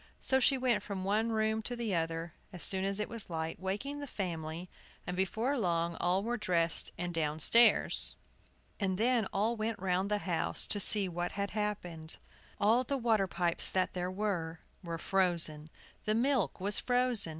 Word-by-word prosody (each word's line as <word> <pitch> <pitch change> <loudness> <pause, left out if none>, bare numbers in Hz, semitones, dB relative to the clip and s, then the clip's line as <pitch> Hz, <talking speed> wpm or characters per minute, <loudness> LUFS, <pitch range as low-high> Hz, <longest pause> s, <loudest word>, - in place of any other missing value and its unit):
So 265 - +1
she 270 +1 +4
went 250 -5 +1
from 195 -2 -5
one 215 +4 0
room 220 0 0
to 245 +3 -4
the 235 -4 -2
other, 165 0 -2 0.2
as 180 -3 -7
soon 190 0 +1
as 195 +1 -1
it 210 - -1
was 230 -4 -8
light, 160 -1 -4
waking 205 +10 -4
the 285 - -6
family, 170 -5 -4 0.4
and 180 - -4
before 220 +9 0
long 170 -3 0
all 185 +3 +1
were 240 +2 -2
dressed 170 -5 +1
and 175 0 -4
downstairs. 160 +9 +3 0.6
And 190 -3 0
then 230 -1 +2
all 215 +4 0
went 220 0 -2
round 185 +1 -1
the 210 - +1
house 175 -5 0
to 205 - +1
see 200 0 +7
what 175 0 -3
had 200 0 -3
happened. 180 -7 -4 0.4
All 225 +5 +3
the 275 +2 -2
water 225 -5 +2
pipes 175 -2 0
that 185 -1 0
there 180 0 -2
were 185 -5 -3 0.2
were 170 -1 -4
frozen. 170 -4 +1 0.4
The 215 0 +1
milk 240 - +1
was 200 +2 +1
frozen. 245 -6 +1
195 Hz, 175 wpm, -32 LUFS, 175-220 Hz, 0.6 s, see